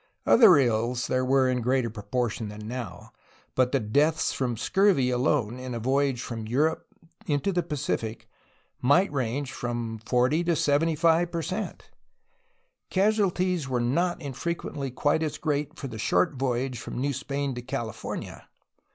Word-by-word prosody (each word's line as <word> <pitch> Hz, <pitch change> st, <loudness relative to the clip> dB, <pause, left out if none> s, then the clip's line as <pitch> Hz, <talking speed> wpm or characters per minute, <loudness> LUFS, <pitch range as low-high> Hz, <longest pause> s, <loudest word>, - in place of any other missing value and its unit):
Other 205 Hz, -, +7 dB
ills 120 Hz, -1 st, +1 dB
there 130 Hz, 0 st, 0 dB
were 130 Hz, 0 st, +3 dB
in 125 Hz, -1 st, 0 dB
greater 125 Hz, -1 st, +1 dB
proportion 110 Hz, +1 st, -2 dB
than 105 Hz, +1 st, -8 dB
now, 115 Hz, -7 st, -6 dB, 0.4 s
but 130 Hz, -1 st, +2 dB
the 135 Hz, -, +2 dB
deaths 145 Hz, +8 st, +1 dB
from 125 Hz, -3 st, -2 dB
scurvy 165 Hz, -, +3 dB
alone 125 Hz, -1 st, 0 dB
in 130 Hz, -1 st, -5 dB
a -, -, -3 dB
voyage 135 Hz, +1 st, +1 dB
from 115 Hz, -2 st, -5 dB
Europe 150 Hz, +7 st, 0 dB, 0.4 s
into 145 Hz, +5 st, +1 dB
the 175 Hz, -1 st, +1 dB
Pacific 140 Hz, -8 st, -3 dB, 0.5 s
might 145 Hz, +9 st, +4 dB
range 130 Hz, 0 st, -2 dB
from 120 Hz, -2 st, -4 dB
40 130 Hz, +7 st, +2 dB
to 170 Hz, -1 st, +2 dB
75 165 Hz, +3 st, +2 dB
per 170 Hz, -1 st, -2 dB
cent. -, -, -5 dB, 1.0 s
Casualties 185 Hz, -6 st, +1 dB
were 125 Hz, -1 st, 0 dB
not 170 Hz, +9 st, 0 dB
infrequently 145 Hz, -1 st, -4 dB
quite 145 Hz, +5 st, +1 dB
as 155 Hz, -1 st, -2 dB
great 150 Hz, -2 st, -2 dB
for 135 Hz, -, -5 dB
the 110 Hz, -3 st, -8 dB
short 155 Hz, -, +2 dB
voyage 130 Hz, -1 st, -2 dB
from -, -, -7 dB
New 140 Hz, +2 st, 0 dB
Spain 140 Hz, +1 st, -3 dB
to 125 Hz, -, -5 dB
Cali 120 Hz, -2 st, -4 dB
fornia. -, -, -7 dB
135 Hz, 150 wpm, -27 LUFS, 120-155 Hz, 1.0 s, Other